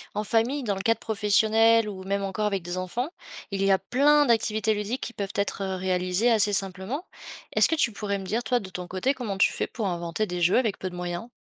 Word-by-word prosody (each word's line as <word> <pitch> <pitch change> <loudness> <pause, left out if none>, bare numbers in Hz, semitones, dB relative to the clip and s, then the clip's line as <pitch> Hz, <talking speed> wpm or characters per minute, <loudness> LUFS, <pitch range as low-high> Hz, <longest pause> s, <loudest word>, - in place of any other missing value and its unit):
En 210 - -1
famille, 230 +7 +1
dans 205 -4 -1
le 195 - -4
cadre 225 +3 +1
professionnel 220 +1 +3
ou 190 -2 -8
même 200 +1 -1
encore 195 +2 -2
avec 195 -3 0
des 175 +1 -5
enfants. 230 - -3 0.4
Il 195 -2 -2
y 195 - +3
a 190 - +4
plein 290 +3 +3
d'activités 220 -2 +1
ludiques 210 +5 -3
qui 235 - -5
peuvent 200 -2 -5
être, 200 0 -1
heu, 190 -1 -2
réalisées 185 +4 +1
assez 210 -3 +4
simplement. 195 - -1 0.5
Est-ce - - +6
que - - -1
tu 235 - +2
pourrais 200 -1 -3
me 190 - -8
dire 225 +6 -1
toi, 245 +2 +1
de 190 - -9
ton 180 -1 -6
côté, 190 +10 -1
comment 220 -7 -4
tu - - +5
fais - - -2
pour 220 -5 -4
inventer 175 +3 -2
des 180 -1 -4
jeux 175 +2 +4
avec 225 -6 -1
peu 185 - -5
de - - -9
moyens? 175 +3 -4
205 Hz, 240 wpm, -26 LUFS, 190-230 Hz, 0.5 s, Est-ce